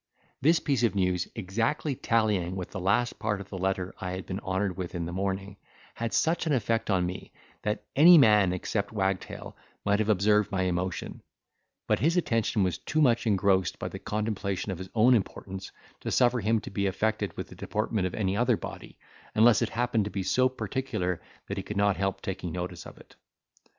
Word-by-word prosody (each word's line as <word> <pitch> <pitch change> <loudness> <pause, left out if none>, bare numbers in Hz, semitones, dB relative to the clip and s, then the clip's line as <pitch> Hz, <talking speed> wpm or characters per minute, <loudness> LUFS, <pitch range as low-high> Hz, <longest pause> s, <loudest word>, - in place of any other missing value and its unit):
This 160 +5 +4
piece 135 -5 0
of 115 -5 +2
news, 90 -2 +1
exactly 115 - -1
tallying 105 -7 +1
with 90 -2 -5
the 100 - -5
last 105 +6 +1
part 105 -1 -1
of 100 - -9
the 95 - -6
letter 95 -1 -1
I 90 0 -3
had 95 0 -5
been 95 +1 -4
honoured 95 -1 -1
with 90 -1 -5
in 85 -1 -2
the 85 - -5
morning, 95 +2 -3 0.4
had 115 -1 -3
such 165 +1 +1
an 155 - +2
effect 115 -2 0
on 95 -3 +2
me, 90 +1 -6 0.3
that 105 +1 -2
any 170 +5 +9
man 105 - +6
except 100 +3 -2
Wagtail 95 -3 -3 0.3
might 100 +1 +2
have 110 0 0
observed 105 +1 +3
my 95 -2 0
emotion; 90 0 -2 0.6
but - - +1
his 165 +4 +2
attention 115 - +1
was 90 -3 -1
too 155 - -2
much 120 -5 +3
engrossed 95 -4 +2
by - - -4
the - - -7
contemplation 105 -2 -2
of 90 - -5
his 95 0 -7
own 120 +3 +6
importance 95 -3 -3 0.3
to - - -4
suffer 125 0 +3
him 110 +1 +2
to - - -8
be 100 -1 0
affected 110 +3 -1
with - - -5
the - - -11
deportment 105 -2 -1
of 90 - -6
any 100 -3 0
other 120 0 +2
body, - - -9 0.4
unless 110 +1 +6
it 115 - +1
happened 120 -3 0
to - - -3
be 100 -2 -3
so 130 +7 +3
particular 125 -9 -3 0.3
that 100 - -4
he - - -1
could 105 - -5
not 100 -1 +3
help 95 -1 -2
taking 95 -3 -4
notice 90 -1 -5
of - - -12
it. - - -17
100 Hz, 200 wpm, -28 LUFS, 95-115 Hz, 0.6 s, any